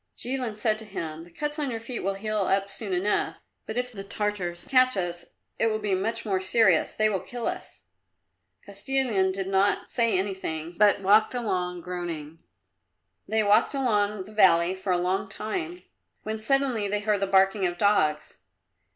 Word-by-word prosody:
Jilin 250 -4 -2
said 215 0 +1
to 220 - -9
him, 165 -5 -6
"The - - -16
cuts 295 - -4
on 290 -2 -1
your 230 -2 -3
feet 230 +2 -6
will 195 +1 -2
heal 215 +1 -2
up 195 0 +1
soon 200 0 -5
enough, 185 +3 0 0.3
but 220 - -5
if 250 0 -1
the 195 -4 -7
Tartars 195 -4 -3
catch 255 -3 +4
us 175 -2 -3 0.3
it 225 - +3
will 215 -1 0
be 210 -2 -2
much 225 +6 -1
more 190 -3 0
serious; 220 +4 +3
they 215 - +3
will 200 -3 0
kill 240 +3 -7
us." - - -5 0.8
Kostilin 200 -2 0
did 190 0 -3
not 195 +1 +1
say 230 -5 +2
anything, 180 -4 -3
but 205 +1 +4
walked 210 +5 +4
along, 180 -7 -2
groaning. 165 -3 -6 0.9
They 220 0 +1
walked 205 +7 +3
along 210 -6 +1
the 210 +3 -14
valley 185 -4 +5
for 190 0 -3
a 180 - +3
long 185 +3 -1
time, 340 - -5 0.4
when 215 0 -4
suddenly 255 -3 +1
they 205 +1 -1
heard 210 -1 +1
the 195 - 0
barking 195 0 +3
of 175 0 -5
dogs. 155 -7 +1
205 Hz, 175 wpm, -26 LUFS, 185-220 Hz, 0.9 s, valley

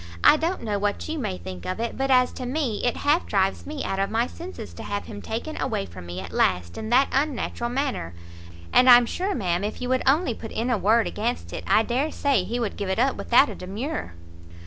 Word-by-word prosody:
I - - +8
don't 330 +2 -2
know 210 -3 -1
what 205 0 -1
you 315 0 -3
may 155 - -3
think 90 0 -8
of 185 - -3
it, 235 0 -2
but 270 +1 -1
as 250 -1 +4
to 255 - -6
me, 255 -6 -1
it 245 - +1
half 300 +4 +2
drives 195 -1 0
me 295 -1 -4
out 195 - -2
of 195 - +1
my 230 +2 +1
senses 345 +8 -9
to - - -9
have 205 0 -4
him 205 -2 -8
taken 235 +8 -4
away 100 - -1
from 90 -1 -11
me 90 +1 -5
at 95 -2 -7
last 85 +1 +1
in 220 - -5
that 260 +3 +5
unnatural 270 -4 -1
manner. 255 - -2 0.6
And 255 - +6
I'm 245 -1 +9
sure, 375 - -2
ma'am, 180 -5 -1
if 210 - -3
you 250 - -3
would 255 0 +2
only 280 -1 +3
put 225 0 -8
in 240 +3 -1
a 240 - +2
word 220 +4 +3
against 235 +4 -3
it, - - -5
I 220 - +4
dare 260 +7 -1
say 275 -9 +1
he 230 +6 -3
would 225 -4 -2
give 200 -2 -3
it 190 - 0
up 260 +3 +2
without 245 +4 +4
a - - -5
demur." 205 - -5
235 Hz, 240 wpm, -25 LUFS, 200-270 Hz, 0.6 s, I'm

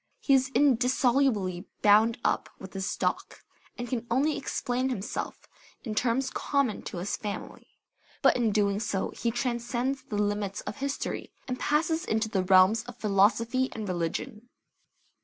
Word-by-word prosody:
He 275 - +2
is 265 0 +4
indissolubly 250 -7 +2 0.2
bound 215 +2 +5
up - - +1
with 190 - -11
his 195 0 -2
stock, - - -2 0.3
and 245 - -4
can 240 -1 -3
only 280 +6 +2
explain 255 -1 -2
himself 225 -3 -4 0.4
in 220 - -4
terms 250 +4 0
common 275 -7 0
to - - -5
his 180 +3 -2
family; 205 -2 -6 0.6
but - - +6
in 235 -3 +2
doing 200 -1 +1
so 205 -3 -2
he 235 - -2
transcends 245 +2 -1
the 210 - -7
limits 205 -1 -1
of - - -6
history, 280 +1 -3 0.2
and 255 -1 -3
passes 320 +2 +1
into 220 -8 0
the 195 -4 0
realms 190 +4 +5
of 245 -1 -10
philosophy 225 +5 +2
and 215 -2 -5
religion. 200 +7 -3
230 Hz, 150 wpm, -28 LUFS, 205-260 Hz, 0.6 s, but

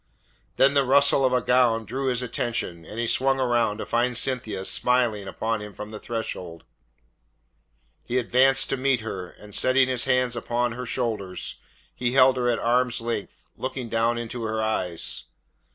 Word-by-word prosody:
Then 135 +1 +4
the 140 -1 +3
rustle 140 +1 +5
of 130 - +3
a 125 -1 +2
gown 120 -3 +2
drew 130 +6 -3
his 125 -1 0
attention, 115 -8 -3
and 105 - -10
he 120 - 0
swung 135 +3 +2
round 120 -5 +1
to - - -5
find 120 0 0
Cynthia 115 -7 -2
smiling 120 -5 +1
upon 110 +3 -2
him 105 -2 -9
from 105 +3 -8
the 110 - -7
threshold. 90 -7 -5 1.4
He 125 - -1
advanced 130 +2 +3
to 135 - 0
meet 130 -2 +1
her, 95 -5 -6
and 105 -1 -15
setting 130 +3 +3
his 125 -2 +1
hands 125 -1 +2
upon 120 +1 -1
her 125 +2 -6
shoulders, 110 -7 -3 0.4
he 125 0 -2
held 130 -1 +6
her 120 -1 +1
at 120 - +1
arm's 125 +1 +1
length, 115 -3 -5
looking 130 -2 -5
down 115 +1 +1
into 120 +1 -5
her 110 -1 -2
eyes. 95 -6 -2
120 Hz, 170 wpm, -25 LUFS, 110-130 Hz, 1.4 s, held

